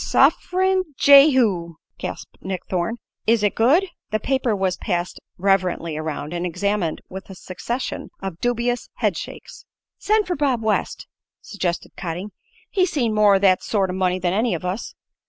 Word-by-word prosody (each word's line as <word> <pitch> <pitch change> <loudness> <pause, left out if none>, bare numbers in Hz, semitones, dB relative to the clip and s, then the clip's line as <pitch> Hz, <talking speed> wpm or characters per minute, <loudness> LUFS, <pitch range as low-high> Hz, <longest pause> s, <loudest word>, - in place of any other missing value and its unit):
"Suff'rin' 370 -3 +2
Jehu!" 255 - +5 0.2
gasped - - -7
Nick 185 -1 -4
Thorne. 185 +6 -1 0.3
"Is 225 -1 +3
it 205 - +2
good?" 280 +12 +4 0.2
The 215 - 0
paper 260 -4 0
was 190 -2 0
passed 175 -3 -2 0.2
reverently 180 -4 +1
around, 155 0 -4
and 175 0 -2
examined 180 -1 -1
with 190 +1 -9
a 190 - -9
succession 235 +8 -5
of 190 -3 -6
dubious 245 0 -1
head - - 0
shakes. - - -9 0.4
"Send 425 +1 +2
for 360 - -2
Bob 270 -5 0
West," 220 -1 -1 0.3
suggested 180 -4 -3
Cotting. 180 +3 -5 0.4
"He's 370 -3 +2
seen 240 -7 0
more 210 -2 +5
o' - - +3
that 185 -2 +4
sort 195 -4 0
o' - - -4
money 185 -1 +1
than 180 -1 -1
any 220 -1 +1
of 170 - -6
us." 185 +5 -4
200 Hz, 160 wpm, -22 LUFS, 180-245 Hz, 0.4 s, Jehu